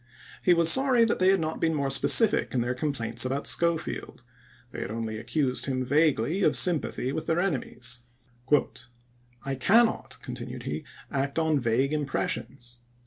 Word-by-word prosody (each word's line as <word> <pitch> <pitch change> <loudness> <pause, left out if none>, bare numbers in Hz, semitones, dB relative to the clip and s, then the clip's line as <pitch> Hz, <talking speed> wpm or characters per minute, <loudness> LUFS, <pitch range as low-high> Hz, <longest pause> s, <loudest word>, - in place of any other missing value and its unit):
He 180 - +4
was 170 -1 +5
sorry 260 -3 +4
they 185 -4 +2
had 195 0 +3
not 160 0 -4
been 160 -1 +1
more 140 -2 -1
specific 215 - +4
in 125 - +1
their 120 +1 -1
complaints 130 -4 -2
about 135 +2 -3
Schofield; 170 -1 -2 0.5
they - - -7
had - - -5
only 110 0 -5
accused 135 +1 -2
him 130 -1 -2
vaguely 150 - +1
of - - +3
sympathy 155 -6 +2
with 155 - -5
their 165 +1 +1
enemies. 125 -8 -3 1.5
"I 135 - -2
cannot," 220 - +2
continued - - -7
he, - - -5 0.2
" - - -23
act 140 +1 -2
on 160 -2 +1
vague 125 +4 0
impressions. 125 -4 -4
145 Hz, 155 wpm, -26 LUFS, 125-170 Hz, 1.5 s, was